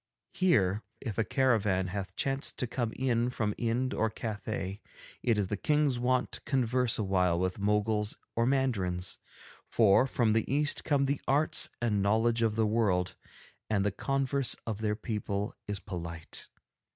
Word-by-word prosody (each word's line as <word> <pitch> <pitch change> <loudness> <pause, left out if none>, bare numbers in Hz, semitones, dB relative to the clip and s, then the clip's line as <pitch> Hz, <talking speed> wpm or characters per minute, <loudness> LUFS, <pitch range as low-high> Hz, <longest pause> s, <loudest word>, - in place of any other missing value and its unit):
Here, 110 - +2 0.2
if 115 -4 -4
a - - +4
caravan 105 -8 +2
hath 95 0 -5
chanced 135 -1 -2
to - - 0
have 115 - -11
come 120 -4 -1
in 120 -2 +1
from 105 -4 -1
Ind 120 +2 0
or 110 - +1
from 110 - -18
Cathay, 105 -3 -4 0.4
it 115 -3 +2
is 105 - +1
the 105 - -1
King's 150 0 +2
wont 125 +1 +1
to - - -6
converse 125 -2 +1
awhile 90 -4 +1
with 95 +2 -1
Moguls 105 +1 +1 0.2
or 115 +1 +2
Mandarins, 100 -10 0 0.5
for 110 +3 +4
from 115 -4 +2
the 110 +2 0
East 145 +1 +1
come 140 -2 +2
the 140 +1 -1
arts 145 +3 +3
and 110 -4 +1
knowledge 115 +3 +2
of 110 -2 +2
the 110 -1 +2
world, 95 -5 +1 0.5
and 100 -2 +1
the 100 - +2
converse 135 +4 0
of 110 -2 -4
their 105 -1 0
people 105 -2 -3
is 105 -1 -3
polite. 85 -4 -7
110 Hz, 165 wpm, -30 LUFS, 100-130 Hz, 0.5 s, a